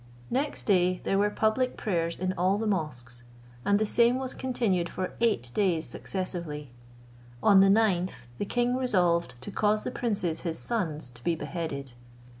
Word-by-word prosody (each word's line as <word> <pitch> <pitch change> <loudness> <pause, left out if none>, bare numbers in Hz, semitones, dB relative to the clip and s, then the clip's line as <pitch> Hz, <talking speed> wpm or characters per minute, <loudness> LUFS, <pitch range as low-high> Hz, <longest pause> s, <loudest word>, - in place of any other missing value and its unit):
Next 275 +4 -1
day 185 -2 +3
there 195 - +1
were 205 +1 +3
public 220 +5 +1
prayers 170 -5 -1
in 185 +1 -1
all 185 +2 +2
the 225 - -2
mosques, 125 - -3 0.4
and 200 +6 +3
the 215 - +1
same 235 +3 +4
was 260 -1 -4
continued 220 -9 0
for 185 -1 -4
eight 205 - +1
days 175 -6 +1
successively. 170 -7 -5 0.7
On 200 -2 +7
the 195 0 +6
ninth 185 - +2
the - - -1
king 245 +3 +1
resolved 175 - +1
to - - -5
cause 210 0 +1
the - - -3
princes 200 -9 -1
his 165 -2 -2
sons 165 - -2
to 120 -1 -13
be 170 - +1
beheaded. 145 -6 -5
185 Hz, 165 wpm, -28 LUFS, 165-215 Hz, 0.7 s, On